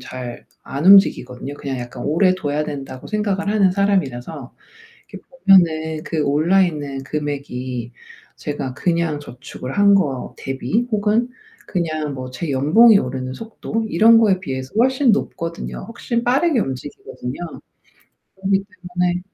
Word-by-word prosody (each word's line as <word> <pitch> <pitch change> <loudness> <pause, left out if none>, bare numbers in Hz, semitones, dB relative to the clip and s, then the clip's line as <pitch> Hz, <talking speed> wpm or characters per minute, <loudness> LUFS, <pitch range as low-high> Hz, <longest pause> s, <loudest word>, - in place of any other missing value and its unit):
잘 125 -1 -8 0.2
안 140 +4 -3
움직이거든요. 145 -9 +4
그냥 135 -2 -5
약간 120 0 -7
오래 185 +5 +3
둬야 150 -3 -2
된다고 135 -3 -7
생각을 205 -2 -1
하는 205 -3 +3
사람이라서 160 -9 -1 0.6
이렇게 - - -11 0.2
보면은 160 -4 +4
그 160 -2 -1
올라 160 +7 +3
있는 145 -5 -4
금액이 130 -5 -4 0.4
제가 135 -3 -4
그냥 170 -2 0
저축을 135 -1 -9
한 200 0 +6
거 140 -9 -2
대비 145 - -2
혹은 215 +3 +1 0.4
그냥 155 -5 -2
뭐 130 -1 -6
제 140 +6 -5
연봉이 185 - +6
오르는 130 0 -4
속도 225 +4 -4
이런 225 +1 +6
거에 205 -4 +3
비해서 130 -7 -5
훨씬 260 +2 +4
높거든요. 170 -5 -3
훨씬 235 0 -2
빠르게 265 +3 +2
움직이거든요. 130 -3 -6 1.0
그러기 195 0 0
때문에 180 -3 -2
160 Hz, 305 characters per minute, -20 LUFS, 135-200 Hz, 1.0 s, 한